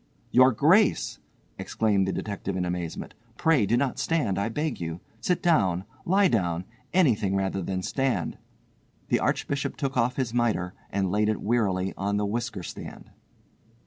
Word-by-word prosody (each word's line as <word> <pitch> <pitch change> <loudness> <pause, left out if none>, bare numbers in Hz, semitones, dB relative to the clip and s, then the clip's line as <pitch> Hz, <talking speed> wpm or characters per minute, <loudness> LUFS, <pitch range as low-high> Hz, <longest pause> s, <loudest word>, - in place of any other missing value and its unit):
"Your 130 +1 +6
Grace!" 165 - +3 0.4
exclaimed 100 -4 +1
the - - 0
detective 100 -1 -4
in 90 - 0
amazement—"pray 105 - -1
do 120 +4 +3
not 130 0 0
stand, 125 - 0
I 100 - 0
beg 150 - -2
you. 85 0 -4 0.2
Sit 180 +10 0
down, 95 - +3 0.2
lie 195 +2 +5
down, 90 - 0 0.3
anything 115 - +3
rather 95 0 -1
than 95 +1 -3
stand." 135 +3 -1 0.7
The - - +3
Archbishop 140 -1 -1
took 135 -2 -2
off 125 +1 +2
his 125 -4 -2
mitre 110 -7 0 0.2
and 95 -2 -1
laid 105 +1 +2
it 110 - 0
wearily 100 -5 0
on 100 +1 -1
the 105 - 0
whisker 115 -2 -3
stand. - - -9
110 Hz, 150 wpm, -26 LUFS, 95-130 Hz, 0.7 s, Your